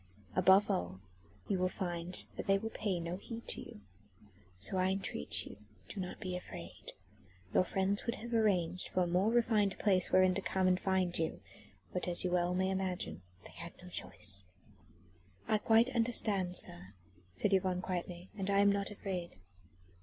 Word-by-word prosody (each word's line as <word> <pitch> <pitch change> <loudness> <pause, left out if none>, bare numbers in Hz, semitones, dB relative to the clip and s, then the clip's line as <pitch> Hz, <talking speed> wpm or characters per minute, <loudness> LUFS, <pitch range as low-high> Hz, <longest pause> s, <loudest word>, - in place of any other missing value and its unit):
Above 190 +2 +6
all 90 +1 -2 0.5
you 195 -3 0
will 185 0 +2
find 175 -1 +1
that - - -6
they 195 0 +5
will 225 +3 -5
pay 200 -5 -2
no 170 +1 -4
heed 230 +3 -8
to - - -3
you. 105 - -11 0.8
So 105 - 0
I 185 0 +2
entreat 190 - -1
you - - -10 0.3
do 200 - -6
not 180 -1 -5
be 185 -3 -4
afraid. 85 - -9 0.6
Your - - +5
friends 195 +3 0
would 235 - 0
have 235 +1 -7
arranged 185 -6 +1
for 185 - +1
a - - -1
more 180 +5 +2
refined 220 -4 +2
place 190 -4 +3
wherein 185 0 +5
to 195 - -1
come 190 -1 +1
and 185 0 +3
find 190 -2 0
you, 160 -1 -1 0.5
but 180 - -2
as 175 -1 +1
you 180 - 0
may - - -1
well 180 0 +1
imagine 185 - -1 0.2
they - - -13
had 170 0 -9
no 180 0 -11
choice." 95 - -3 1.0
"I 215 - +2
quite 225 +4 +4
understand, 210 -6 +2
sir," 95 +3 0 0.4
said 190 - +1
Yvonne 185 -1 +1
quietly, 180 0 -5
"and 195 -1 -3
I 200 - +3
am 200 0 +6
not 200 0 -1
afraid." 190 -4 -5
185 Hz, 175 wpm, -34 LUFS, 175-200 Hz, 1.0 s, Above